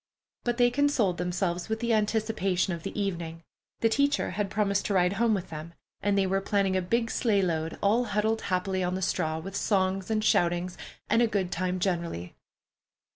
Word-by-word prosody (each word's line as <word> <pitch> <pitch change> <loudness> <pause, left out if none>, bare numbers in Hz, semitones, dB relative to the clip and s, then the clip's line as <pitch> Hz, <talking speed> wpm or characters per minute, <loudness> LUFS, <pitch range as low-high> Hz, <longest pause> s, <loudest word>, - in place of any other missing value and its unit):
But 240 -1 -1
they 245 -1 +4
consoled 245 -10 +2
themselves 180 +1 -1
with 220 0 -1
the 235 0 +1
anticipation 210 -4 +1
of 170 - -5
the 195 +4 -5
evening. 170 -4 -3 0.4
The 225 - +4
teacher 280 +4 +1
had 200 +2 -2
promised 200 -1 0
to 200 - 0
ride 180 0 +3
home 225 +1 +2
with 185 -3 -5
them, 160 +2 -7 0.3
and 205 -1 +1
they 195 - +3
were 195 +1 +1
planning 195 -1 +1
a 185 - +2
big 230 +5 0
sleigh 205 -5 +2
load, 165 -2 -1
all 225 +5 +3
huddled 220 +1 0
happily 185 0 0
on 180 +1 -1
the 190 - -3
straw, 160 -2 0
with 195 +5 -7
songs 190 -2 0
and 215 -1 +1
shoutings 175 -1 +2 0.3
and 230 - +3
a 235 - +4
good 195 -4 -1
time 185 +1 -1
generally. 170 - -2
195 Hz, 190 wpm, -28 LUFS, 180-220 Hz, 0.4 s, they